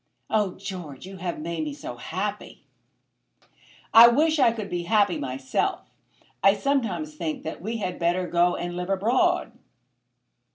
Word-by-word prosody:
"Oh, 210 -4 +1
George, 180 -7 -8
you 190 0 -9
have 175 -1 -4
made 165 +1 -4
me 150 -2 -4
so 125 - -7
happy." 195 +10 -5 1.3
"I 230 +1 +11
wish 310 +6 +3
I 245 -4 +5
could 220 -3 -5
be 175 -2 -3
happy 205 -1 +2
myself. 130 -1 -2 0.5
I 195 +1 +6
sometimes 205 - -1
think 155 0 -4
that 160 - -6
we 225 +5 -3
had 185 -4 -4
better 175 +2 +1
go 175 +1 +2
and 175 0 -4
live 180 +1 -4
abroad." 210 +6 +1
185 Hz, 150 wpm, -25 LUFS, 170-215 Hz, 1.3 s, I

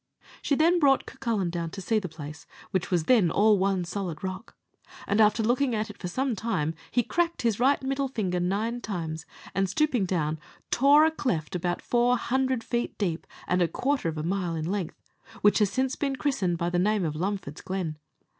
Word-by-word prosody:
She 285 - +1
then 335 +4 +4
brought 275 -4 +4
Cucullin 205 -7 -2
down 170 -1 -3
to 195 - -8
see 215 +4 +1
the 185 -4 -6
place, 155 0 -9 0.2
which 185 -2 -1
was 175 -4 +1
then 215 -4 +4
all 210 +3 +4
one 190 -2 +1
solid 175 -3 -4
rock; 190 +4 -6 0.5
and, 205 +2 +2
after 215 +1 +4
looking 245 +2 +2
at 215 0 -2
it - - -17
for 180 - -4
some 255 +6 -1
time, 185 -7 -1 0.2
he 245 - +2
cracked 340 +4 -1
his 225 -3 +1
right 270 +3 +4
middle 275 +1 0
finger 195 -9 -1
nine 210 +7 -1
times, 165 -6 -4 0.3
and, 195 -1 +1
stooping 255 -4 +1
down, 155 -4 -1 0.3
tore 285 +4 +6
a 320 - +3
cleft 200 - -2
about 175 0 -2
four 245 +1 +3
hundred 260 0 0
feet 240 -1 -2
deep, 175 -5 -2 0.2
and 180 0 +2
a 175 - +4
quarter 260 - -1
of 160 - -5
a 155 - -3
mile 175 -1 -1
in 155 -1 -3
length, 185 -1 -3 0.4
which 205 +1 +5
has 210 -2 +3
since 260 +5 0
been 275 -2 -1
christened 200 - 0
by 170 +1 -1
the 175 - +1
name 205 0 +2
of 150 -2 -2
Lumford's 180 -3 -3
Glen. 175 -5 -4
200 Hz, 200 wpm, -27 LUFS, 175-245 Hz, 0.5 s, tore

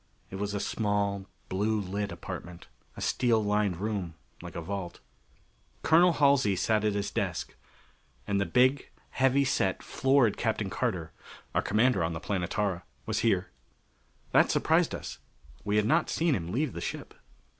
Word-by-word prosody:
It 95 - -5
was 100 +1 -3
a - - -1
small 100 -2 -1 0.2
blue 105 +3 0
lit 100 +1 -3
apartment 85 -1 -8 0.3
a - - -7
steel 115 -3 +2
lined 105 -3 +1
room 100 -4 -3 0.3
like - - -9
a 85 - -3
vault. 95 -1 -5 0.8
Colonel 170 +2 +5
Halsey 140 -9 +3
sat 110 +3 +1
at 105 -1 +1
his 100 0 -2
desk. - - -2 0.7
And 100 0 0
the 100 - 0
big, 130 +3 +3 0.2
heavy 135 +1 +3
set, 95 -7 0
florid 135 -5 +2
Captain 110 -4 -1
Carter 90 -10 -2 0.4
our - - +2
commander 110 -3 +2
on 80 +1 -1
the 80 - -4
Planetara 95 0 -1 0.2
was - - -1
here. - - +1 0.8
That - - +5
surprised - - +2
us: - - -7 0.4
we 105 0 0
had 105 0 +3
not 155 +8 +2
seen 165 -1 +1
him 85 -7 -3
leave 135 +5 -1
the 85 - -6
ship. - - -5
105 Hz, 155 wpm, -29 LUFS, 95-125 Hz, 0.8 s, Colonel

